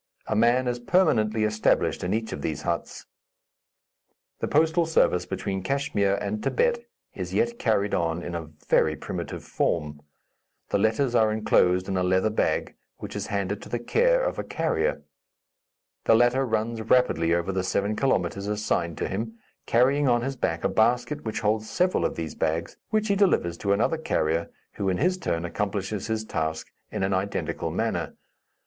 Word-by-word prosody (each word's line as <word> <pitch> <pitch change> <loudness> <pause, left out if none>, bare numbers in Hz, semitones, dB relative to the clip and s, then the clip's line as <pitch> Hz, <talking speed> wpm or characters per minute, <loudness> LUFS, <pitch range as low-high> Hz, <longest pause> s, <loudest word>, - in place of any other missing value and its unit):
A 110 - -1
man 120 +3 +3
is 120 0 -1
permanently 120 - +2
established 110 0 +1
in 90 - -1
each 110 0 -1
of 75 - -6
these 75 -1 -3
huts. - - -3 1.3
The - - -2
postal 160 +2 +3
service 90 - +2
between 95 -1 -3
Kachmyr 100 -4 0
and 105 +1 -3
Thibet 475 0 0 0.3
is - - -5
yet 235 +1 +1
carried 105 -3 +1
on 85 0 0
in 85 - -5
a 85 -2 -5 0.2
very 80 0 +3
primitive - - -6
form. 75 -2 -1 0.7
The - - +1
letters 115 +5 +1
are 110 -2 +4
enclosed 90 -4 +2
in 95 -1 -1
a - - +1
leather 95 +4 +2
bag, 110 - 0 0.2
which - - -8
is - - -3
handed 100 0 -2
to - - -10
the 120 - -1
care - - +2
of - - -2
a - - -2
carrier. - - -1 1.0
The 115 - +6
latter 120 +3 +3
runs 110 0 -1
rapidly 85 -8 +3
over 85 +2 -1
the 95 -1 -1
seven 100 +3 0
kilometres 100 -6 0
assigned 105 -6 -1
to - - -2
him, 110 +3 -4 0.3
carrying 135 +4 +3
on 120 -1 +3
his 135 +1 -2
back 85 -9 -2
a - - +3
basket 120 +6 +1
which 110 - -3
holds 110 0 0
several 180 +1 +1
of - - -1
these 80 -2 -4
bags, 80 +1 -2
which 215 0 +1
he 200 - +3
delivers 180 - +2
to 100 - 0
another 115 +11 +2
carrier, 85 - 0 0.3
who, 100 -1 0
in 90 - 0
his 185 +1 +1
turn, 85 - -2
accomplishes 100 +3 -3
his 110 -1 -2
task 80 -4 -3 0.2
in - - -2
an 95 0 +1
identical 95 +2 -2
manner. - - -2
110 Hz, 175 wpm, -26 LUFS, 95-125 Hz, 1.3 s, The